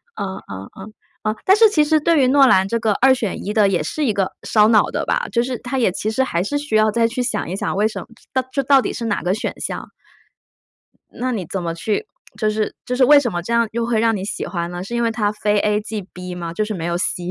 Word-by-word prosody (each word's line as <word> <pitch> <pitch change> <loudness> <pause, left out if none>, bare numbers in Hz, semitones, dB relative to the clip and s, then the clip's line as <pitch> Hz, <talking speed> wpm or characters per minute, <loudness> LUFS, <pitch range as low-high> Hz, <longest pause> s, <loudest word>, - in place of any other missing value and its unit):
嗯 190 -1 -4
嗯 100 0 -8
嗯 210 +3 -10 0.3
嗯。 215 0 0
但 380 - +5
是 450 0 +7
其 310 -7 +3
实 310 +1 +3
对 315 0 +3
于 - - +4
诺 275 0 +6
兰 190 -6 +4
这 230 +4 -1
个 220 -2 +1
2 265 +1 +6
选 225 -6 -3
1 205 - -2
的 210 -2 +4
也 180 -5 0
是 300 - -2
一 225 - +1
个 195 -2 -1
烧 215 -1 +4
脑 220 -2 +5
的 - - -3
吧？ - - 0
就 235 0 +1
是 255 -1 -3
它 250 +3 -4
也 230 -7 +2
其 210 +3 -3
实 220 +4 +1
还 170 -10 -1
是 250 +10 -1
需 285 -6 0
要 215 0 +4
再 230 +2 +2
去 240 +3 -1
想 230 -7 -2
一 - - -4
想， - - -2
为 205 +2 +2
什 220 - -2
么 - - -10
就 230 -1 -21 0.2
到 255 - -17
就 275 - 0
到 270 0 +5
底 - - -3
是 235 - -5
哪 205 -3 -1
个 180 - 0
选 215 - -3
项？ - - -5 1.2
那 255 +1 -3
你 195 -6 -3
怎 190 - -3
么 170 -1 -3
去 215 - -2 0.3
就 215 - +1
是 215 0 -1
就 250 - -2
是 255 - +3
为 290 +2 +7
什 260 -4 -1
么 175 - -3
这 180 - -7
样 235 0 +3
又 235 0 -1
会 230 -2 +1
让 225 0 +2
你 190 - -4
喜 200 - -4
欢 170 -2 -3
呢？ 175 0 -5
是 235 +5 -5
因 235 - 0
为 230 - +1
它 215 -2 0
非 210 0 0
A 210 +1 +1
即 215 0 -5
B 180 0 -7
吗？ 170 -1 -5
就 215 - -1
是 215 - -4
没 170 -4 -4
有 170 0 -1
C 175 0 -2
215 Hz, 300 characters per minute, -20 LUFS, 195-250 Hz, 1.2 s, 是